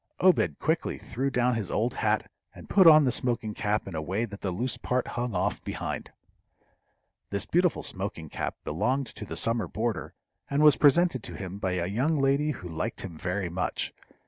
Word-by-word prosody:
Obed 185 -1 +3
quickly 160 +1 -1
threw 135 +5 -3
down 125 -1 +2
his 110 -6 -2
old 115 +3 0
hat, - - 0 0.3
and - - -12
put 190 -4 +6
on 155 -1 +9
the 125 - +3
smoking 120 -3 0
cap 105 -3 -1
in 95 - -6
a 80 - -2
way 95 +9 -1
that 105 -2 -10
the 95 - -1
loose 120 +8 -1
part 125 0 -1
hung 120 -3 -3
off - - -1
behind. - - -4 1.2
This 100 0 -1
beautiful 175 0 +2
smoking 95 -5 -4
cap - - -4
belonged 130 - 0
to 110 -2 -9
the - - -5
summer 115 -4 +1
boarder, 110 +3 -3 0.3
and 140 +2 +2
was 150 -2 +8
presented 150 -2 +4
to - - -6
him 95 0 -6
by 95 -2 -1
a 90 -2 -1
young 130 - +1
lady 140 +2 +2
who 120 -11 -5
liked 80 +7 -4
him 90 -4 -7
very 90 +4 -2
much. 90 +2 -2
115 Hz, 195 wpm, -28 LUFS, 95-135 Hz, 1.2 s, on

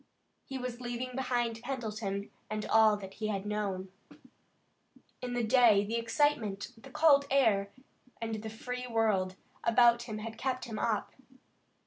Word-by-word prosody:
He 270 - -5
was 250 -1 -5
leaving 245 +1 -4
behind 240 -3 -1
Pendleton 215 -6 -4 0.2
and 215 0 -3
all 220 -1 +5
that 195 -1 -9
he 215 +1 -3
had 200 -2 -2
known. 200 -3 -3 1.3
In 250 -1 -4
the 245 -1 0
day 225 -3 +5
the 225 +3 -1
excitement, 230 -4 0
the 230 +4 -14
cold 280 0 +5
air, 220 -8 +3 0.5
and 225 -2 -3
the 220 - -5
free 250 +3 -5
world 215 -5 +1 0.3
about 235 0 +5
him 215 - -3
had 220 +1 -7
kept 260 -1 -2
him 225 -3 -5
up. 220 -3 0
225 Hz, 145 wpm, -31 LUFS, 210-250 Hz, 1.3 s, all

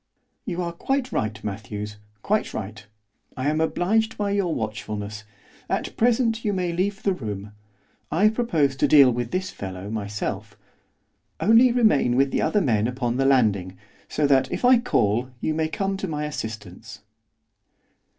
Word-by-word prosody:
'You 180 -2 -2
are 170 - -3
quite 270 +8 -1
right, 110 0 -2
Matthews, 105 0 -5 0.3
quite 215 +1 0
right. 105 0 -6 0.5
I 130 +2 -1
am 155 +1 0
obliged 220 +7 +1
by 205 -1 -1
your 200 -4 0
watchfulness. 110 -1 -5 0.4
At - - -2
present 230 -1 +2
you 210 - 0
may 180 -2 -1
leave 195 +4 -1
the 195 - +2
room 105 - -6 0.6
I 190 +8 +4
propose 165 - +1
to - - +3
deal 140 -4 +7
with 120 0 -3
this 185 +6 -2
fellow 95 +1 -7
myself, 105 -1 -4 0.8
only 230 +4 +5
remain 215 - +3
with 135 +1 +3
the - - 0
other 210 - +2
men 110 - +1
upon 125 -1 -2
the 135 - +1
landing, 100 -9 +2 0.3
so 150 - 0
that, 135 -2 +3
if - - -1
I 250 -1 +7
call, 120 - +1
you 155 - -1
may 160 0 0
come 195 +4 -2
to 195 - -4
my 150 -2 -3
assistance. 110 -6 -7
140 Hz, 160 wpm, -24 LUFS, -, 0.8 s, deal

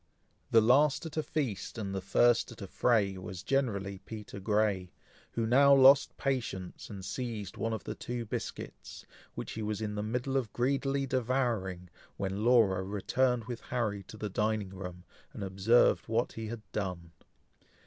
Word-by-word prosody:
The 115 - +6
last 140 +7 +4
at 160 - -7
a 155 - +1
feast, 140 -9 -3
and 100 -3 -3
the 95 - -2
first 120 +5 +3
at 115 - -12
a - - -4
fray, 100 -2 +1
was 90 -1 -7
generally 100 -8 -1
Peter 105 -1 -8
Grey, 100 -2 +1 0.4
who 115 - 0
now 140 +4 +6
lost 135 0 +6
patience, 115 -9 -3
and 95 -3 -7
seized 110 -6 -4
one 115 - -2
of 110 -3 -3
the - - -4
two 120 -1 -5
biscuits, - - -6 0.3
which - - -5
he 110 - -5
was 105 -1 -2
in 105 -1 -3
the 105 - -2
middle 125 +5 -1
of 120 -6 -2
greedily 135 +2 0
devouring, 120 -8 -1 0.3
when 100 +1 -2
Laura 110 -6 +4
returned 115 +5 0
with 120 -1 -6
Harry 110 -5 -2
to 110 - -10
the 105 - -3
dining 105 -1 -1
room, 90 -2 -8 0.3
and - - -6
observed 100 +5 +3
what 115 +2 0
he 115 -1 -6
had 115 0 -6
done. 90 -4 -4
110 Hz, 170 wpm, -31 LUFS, 100-125 Hz, 0.4 s, The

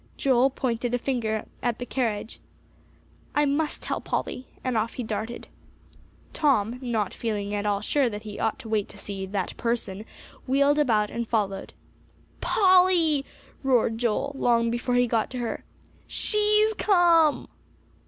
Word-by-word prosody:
Joel 260 -1 +3
pointed 245 -2 -1
a - - +2
finger 230 -4 -2 0.2
at 240 -2 0
the 245 - -5
carriage. 230 -4 -2 1.0
"I 295 0 +4
must 295 +2 -1
tell - - -3
Polly," 255 - -3 0.2
and 255 -2 -1
off 220 +1 0
he 250 - -4
darted. 220 +2 -4 0.9
Tom, 250 -6 +1
not 225 -6 -1
feeling 205 -3 -3
at 205 0 -1
all 200 -1 0
sure 280 -4 +2
that 210 0 -7
he 210 -2 -8
ought 225 - 0
to 265 -4 -10
wait 215 -2 -1
to - - -13
see 195 -1 -5
"that 195 -1 -3
person," 225 -4 -2 0.4
wheeled 280 +3 +3
about 220 -7 +2
and 235 -1 -3
followed. 200 -4 -2 0.7
"Polly," 360 -7 +4 0.4
roared 240 -4 +2
Joel, 245 +4 0
long 230 -1 +2
before 245 +1 -1
he 245 0 +4
got 230 -2 0
to 255 - -6
her. 240 -2 -3 0.4
"She's 425 0 +3
come!" 340 -6 +4
240 Hz, 150 wpm, -26 LUFS, 220-280 Hz, 1.0 s, I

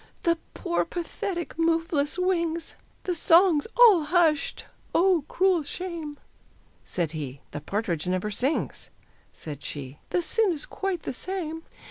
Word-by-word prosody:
"The 335 -3 +2 0.2
poor, 345 -3 0
pathetic 345 0 -4
moveless 330 -2 +1
wings!" 340 -3 0 0.3
The 360 - -1
songs 335 -1 +5
all 425 -10 +7
hushed 320 -1 +2 0.3
"Oh, 350 -4 +4
cruel 370 -2 +3
shame!" 315 -1 -5 0.7
Said 170 -4 -2
he, 140 -4 -6
"The 145 - -5
partridge 180 -2 -2
never 185 +3 -1
sings," 260 +9 -1 0.4
Said 145 -3 -8
she, 140 -1 -6
"The 355 - +1
sin 425 0 +2
is 300 -2 -3
quite 385 -5 -3
the - - -3
same." 325 +1 -3
330 Hz, 130 wpm, -26 LUFS, 250-355 Hz, 0.7 s, all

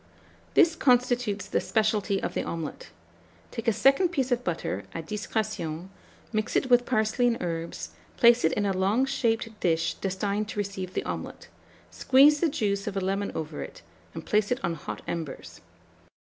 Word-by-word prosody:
This 330 -1 +5
constitutes 245 -6 +2
the - - 0
specialty 215 -2 +1
of - - -2
the - - -1
omelet. 165 - -5 0.6
Take 230 -1 -6
a - - +6
second 275 - +4
piece 270 -6 -1
of 245 0 +1
butter, 160 - -3
à 165 - -4
discrétion, 195 -4 -3 0.4
mix 215 0 -1
it 260 - +1
with 245 0 +5
parsley 220 0 +2
and 235 -1 +1
herbs, 165 - -4 0.3
place 235 0 +6
it 160 - +4
in 205 - 0
a 195 - +1
long 200 +8 +2
shaped 230 -4 -1
dish 165 -1 +1
destined 200 +2 -2
to - - -7
receive 190 -2 -4
the - - 0
omelet; - - -6 0.4
squeeze 285 +3 +5
the 335 - +2
juice 205 -8 -1
of 200 -1 -3
a - - +2
lemon 195 +2 -1
over 155 -1 -4
it, - - -9 0.3
and - - -7
place 210 -1 +2
it 245 - 0
on 170 - 0
hot 165 - -7
embers. 165 -5 -6
210 Hz, 175 wpm, -27 LUFS, 185-245 Hz, 0.6 s, a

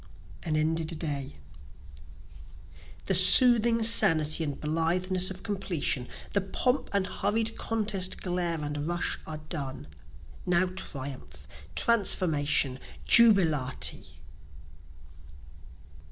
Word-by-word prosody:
An 155 -2 -3
Ended 160 +1 -2
Day 145 - -6 1.7
The 195 - 0
soothing 230 +4 +5
sanity 160 -7 +5
and 145 -3 -5
blitheness 180 +4 -1
of 190 0 -10
completion, 180 - -2 0.3
The 200 - +1
pomp 250 +8 -2
and 200 -2 -1
hurried 210 +4 -2
contest 205 -4 -1
glare 175 -3 -3
and 145 0 -5
rush 175 0 -3
are 155 -1 -7
done; 135 - -6 0.6
Now 180 +1 +1
triumph! 130 - -7 0.3
transformation! 150 - +1 0.3
jubilate! 165 - +3
175 Hz, 90 wpm, -27 LUFS, 150-195 Hz, 1.7 s, soothing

